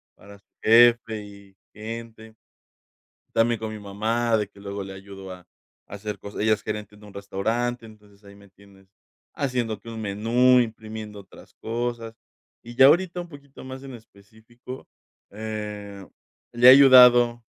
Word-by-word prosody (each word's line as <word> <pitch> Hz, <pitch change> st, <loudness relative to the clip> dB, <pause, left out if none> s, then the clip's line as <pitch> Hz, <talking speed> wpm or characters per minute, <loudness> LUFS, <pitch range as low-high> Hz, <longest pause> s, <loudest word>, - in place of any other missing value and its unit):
para 100 Hz, 0 st, -16 dB
su -, -, -41 dB, 0.2 s
jefe 115 Hz, -1 st, +4 dB
y 100 Hz, -1 st, -16 dB, 0.2 s
gente 110 Hz, 0 st, -9 dB, 1.0 s
también 115 Hz, 0 st, +2 dB
con 110 Hz, -1 st, -5 dB
mi 110 Hz, -, -8 dB
mamá 110 Hz, +3 st, -1 dB
de 105 Hz, -2 st, -2 dB
que 100 Hz, -1 st, -19 dB
luego 100 Hz, 0 st, -6 dB
le 95 Hz, -, -9 dB
ayudo 95 Hz, -1 st, -11 dB
a 90 Hz, -1 st, -13 dB, 0.4 s
hacer 100 Hz, 0 st, -7 dB
cosas, 100 Hz, +2 st, -9 dB
ella 110 Hz, +1 st, +2 dB
es -, -, -11 dB
gerente 105 Hz, -1 st, -6 dB
en 105 Hz, -, -18 dB
un 105 Hz, -, -15 dB
restaurante, 115 Hz, +4 st, -3 dB
entonces, 105 Hz, -2 st, -19 dB
ahí 100 Hz, 0 st, -15 dB
me 100 Hz, -1 st, -18 dB
tienes 95 Hz, 0 st, -22 dB, 0.5 s
haciendo 125 Hz, -6 st, -3 dB
que 115 Hz, -, -14 dB
un 115 Hz, -1 st, -7 dB
menú, 115 Hz, +5 st, +2 dB
imprimiendo 110 Hz, -2 st, -6 dB
otras 95 Hz, -, -17 dB
cosas, 115 Hz, 0 st, -5 dB, 0.5 s
y 120 Hz, +1 st, -11 dB
ya 135 Hz, 0 st, +8 dB
ahorita 175 Hz, +3 st, +2 dB
un 175 Hz, -, -9 dB
poquito 140 Hz, -4 st, -14 dB
más 130 Hz, +1 st, -9 dB
en 135 Hz, -2 st, -9 dB
específico, 110 Hz, +4 st, -14 dB, 0.4 s
eh, 105 Hz, -2 st, -7 dB, 0.5 s
le 120 Hz, +1 st, +3 dB
he -, -, +12 dB
ayudado 125 Hz, -3 st, +7 dB
110 Hz, 155 wpm, -24 LUFS, 100-120 Hz, 1.0 s, he